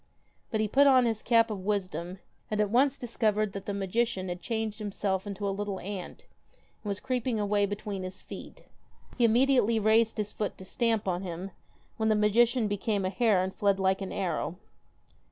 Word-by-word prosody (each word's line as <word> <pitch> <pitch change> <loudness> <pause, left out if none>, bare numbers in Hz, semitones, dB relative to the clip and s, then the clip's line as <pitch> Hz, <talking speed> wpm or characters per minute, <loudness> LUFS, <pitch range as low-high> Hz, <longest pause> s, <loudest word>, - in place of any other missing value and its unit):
But 220 - -1
he 215 - +1
put 280 +6 +5
on 260 -2 +6
his 225 -2 0
cap 230 -1 +3
of 195 -3 -5
wisdom, 185 -3 -2 0.3
and 215 - -2
at 210 -1 +1
once 270 +3 +3
dis 240 -2 -8
covered 215 -3 +1
that 195 - -7
the - - -1
magician 195 -1 -1
had 175 0 -5
changed 220 -3 -3
himself 200 -2 -2
into 200 0 -3
a - - +1
little 200 -1 -3
ant 190 -1 -7 0.6
that - - -9
was 200 0 -2
creeping 250 -3 -1
away 205 0 +2
between 205 -1 -4
his 185 +1 -6
feet. - - -10 0.6
He 240 - +5
immediately 235 -1 +4
raised 220 +2 +3
his 210 -1 -2
foot 210 - -3
to 190 - -11
stamp 225 0 0
on 180 -1 0
him, 185 +1 -6 0.5
when 220 -1 +1
the 215 - +4
magician 225 +3 +3
became 205 -1 -1
a 185 - -1
hare 200 -2 +3
and 190 0 -3
fled 200 -1 +2
like 190 +1 +1
an 190 - -4
arrow. 170 -2 -2
210 Hz, 195 wpm, -29 LUFS, 195-230 Hz, 0.6 s, on